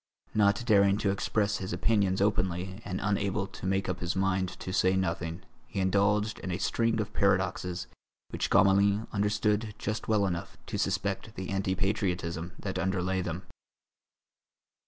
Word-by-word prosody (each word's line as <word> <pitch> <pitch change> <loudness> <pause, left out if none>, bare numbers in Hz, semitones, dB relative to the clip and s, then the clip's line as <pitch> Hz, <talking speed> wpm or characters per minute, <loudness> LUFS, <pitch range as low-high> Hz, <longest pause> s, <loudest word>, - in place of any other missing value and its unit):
Not 105 +2 +3
daring 100 -3 +5
to 100 -2 +1
express 100 +1 0
his 95 +1 -4
opinions 100 -4 +2
openly 95 -1 0
and 95 -4 -3
unable 100 -1 0
to 95 -1 -7
make 95 0 0
up - - -2
his 85 +1 -2
mind 95 -1 +1
to 95 - -5
say 95 0 +3
nothing, 85 -3 -2 0.2
he - - -4
indulged 105 +3 +2
in 95 - -5
a 90 - -1
string 115 +3 +1
of 105 -1 -3
paradoxes 95 -2 +1 0.5
which - - -2
Gamelin 100 +2 +4
understood 105 +1 +1
just 110 +2 -3
well 105 -2 +3
enough 85 -3 -3
to - - -4
suspect 100 +2 -1
the 95 - -5
anti 95 -1 0
patriotism 90 -4 -1
that - - -4
underlay 95 0 0
them. 90 +1 -4
95 Hz, 155 wpm, -29 LUFS, 95-105 Hz, 0.5 s, daring